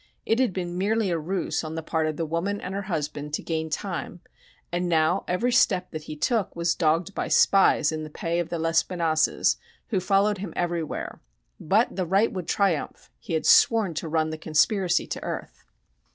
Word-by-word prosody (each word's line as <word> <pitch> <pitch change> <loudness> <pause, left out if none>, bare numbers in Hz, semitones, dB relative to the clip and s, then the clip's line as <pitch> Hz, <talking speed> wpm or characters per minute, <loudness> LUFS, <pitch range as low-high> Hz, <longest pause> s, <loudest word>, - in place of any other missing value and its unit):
It 225 +2 +1
had 255 -5 +2
been 175 -1 -4
merely 210 0 +1
a 170 - 0
ruse 180 +3 -2
on 160 0 -5
the 160 - -4
part 160 0 0
of 155 -1 -3
the 165 - -1
woman 170 +6 -2
and 185 - -6
her 200 - -2
husband 150 -2 -3
to - - -5
gain 160 -1 -2
time, 180 0 -4 0.5
and 175 +1 -1
now 165 +3 +2
every 210 +8 0
step 190 -6 +2
that 155 -2 -7
he 155 - -6
took 220 +6 0
was 170 0 +1
dogged 165 +3 +1
by - - -3
spies 195 -6 +4
in 155 0 -4
the 155 - -7
pay 165 +3 -2
of 170 - -2
the 170 - -2
Lespinasses, 165 -1 +1 0.3
who 205 -6 +1
followed 200 +2 +2
him 185 -4 -6
everywhere. 170 -3 -3 0.4
But 210 +9 +1
the 185 -2 -2
right 195 +6 +3
would 185 -3 -5
triumph! 190 -7 -1
He - - -6
had 160 - 0
sworn 220 -7 +5
to 160 - -4
run 160 0 0
the 155 - -6
conspiracy 175 +4 +2
to - - -5
earth! - - -6
175 Hz, 195 wpm, -25 LUFS, 160-195 Hz, 0.5 s, sworn